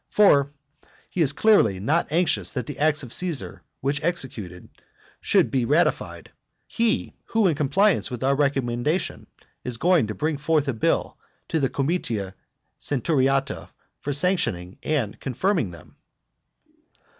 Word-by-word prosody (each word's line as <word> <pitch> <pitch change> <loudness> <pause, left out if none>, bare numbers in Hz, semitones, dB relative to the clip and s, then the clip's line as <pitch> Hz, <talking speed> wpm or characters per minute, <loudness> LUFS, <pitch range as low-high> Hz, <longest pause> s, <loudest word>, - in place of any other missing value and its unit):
For 145 -10 +5 0.6
he 180 - -1
is 145 - +5
clearly 155 - +3
not 150 - 0
anxious 170 0 +1
that 125 -4 -3
the 145 - -7
acts 155 0 +2
which 120 - 0
Caesar 175 -6 -1 0.4
executed 120 - -4 0.5
should - - +2
be 130 -2 +1
ratified, 150 +8 0 0.4
he, 230 -1 0
who 225 -2 +1
in 175 - +4
compliance 170 +7 +2
with 125 -1 -5
our 135 +1 +3
recommendation 140 +2 -1 0.4
is 125 -2 -4
going 170 -5 +3
to 105 - -5
bring 155 -1 -1
forward 150 0 +1
a 135 - 0
bill 110 - -1 0.3
at 160 - +2
the 135 - +1
comitia 120 - -2 0.5
centuriata 135 0 0 0.3
for 145 - -4
sanctioning 120 - -1
and 135 -10 -2
confirming 155 - 0
them. 85 -2 -14
140 Hz, 135 wpm, -24 LUFS, 120-170 Hz, 0.6 s, For